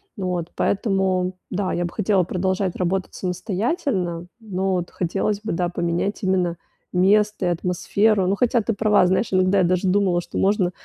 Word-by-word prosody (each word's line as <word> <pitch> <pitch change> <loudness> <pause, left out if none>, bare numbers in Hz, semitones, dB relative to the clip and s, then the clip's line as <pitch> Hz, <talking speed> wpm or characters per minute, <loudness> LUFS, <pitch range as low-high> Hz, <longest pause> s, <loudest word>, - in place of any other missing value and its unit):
Вот 180 -4 -2
поэтому, 190 -3 0 0.2
да, 190 0 -1
я 175 - -1
бы 170 - -6
хотела 200 -3 +2
продолжать 185 +1 -1
работать 185 +1 -1
самостоятельно, 185 - -2
но 195 -3 -2
вот 175 -1 -2
хотелось, 195 +4 -2
да, 175 -4 -1
бы 175 - -8
поменять 170 +4 -1
именно 180 -3 +1 0.3
место 205 +2 +2
и - - +2
атмосферу. 185 +4 +1
Ну, 190 +2 +1
хотя 240 +1 +2
ты 220 +2 -1
права, 210 -2 +3
знаешь, 190 +5 +1
иногда 185 +1 +3
я - - +4
даже 180 +2 +1
думала, 185 -2 +2
что - - -5
можно 190 -2 +2
185 Hz, 165 wpm, -22 LUFS, 180-200 Hz, 0.3 s, я